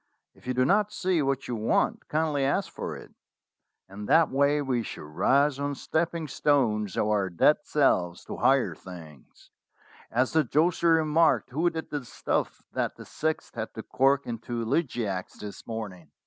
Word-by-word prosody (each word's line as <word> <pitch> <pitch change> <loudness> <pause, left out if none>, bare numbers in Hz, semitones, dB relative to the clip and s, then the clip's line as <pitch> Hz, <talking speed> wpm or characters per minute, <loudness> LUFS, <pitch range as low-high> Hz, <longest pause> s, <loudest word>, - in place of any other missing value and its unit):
'If - - -19
you 130 - -1
do 130 0 +3
not 205 +6 +2
see 180 -3 0
what 135 -1 -1
you 120 - -2
want, 110 0 0
kindly 150 -2 0
ask 140 +9 0
for - - -5
it/ - - -13 0.7
In 100 +2 -8
that 160 +2 +4
way 140 +2 +3
we 130 -4 0
shall 110 - -7
rise 135 - +2
on 145 0 -2
stepping 165 +2 -2
stones 115 -9 +1
of - - +2
our 105 -3 +1
dead 90 - +4
selves 90 - +1
to - - -6
higher 130 +1 +3
things, 80 -7 -13 0.6
as 125 +2 +1
the 160 -1 +4
josser 165 +5 +2
remarked 160 -2 +3
who 160 +7 +2
did 160 -1 -6
the 145 -3 -3
stuff 120 - -2
that - - -1
the - - -11
sixth 160 +1 -3
had 110 -1 -5
to 110 - -6
cork 135 +1 +2
into 120 0 -4
Elegiacs 115 - -2
this 105 -1 -9
morning." 100 -8 -6
135 Hz, 170 wpm, -27 LUFS, 110-155 Hz, 0.7 s, that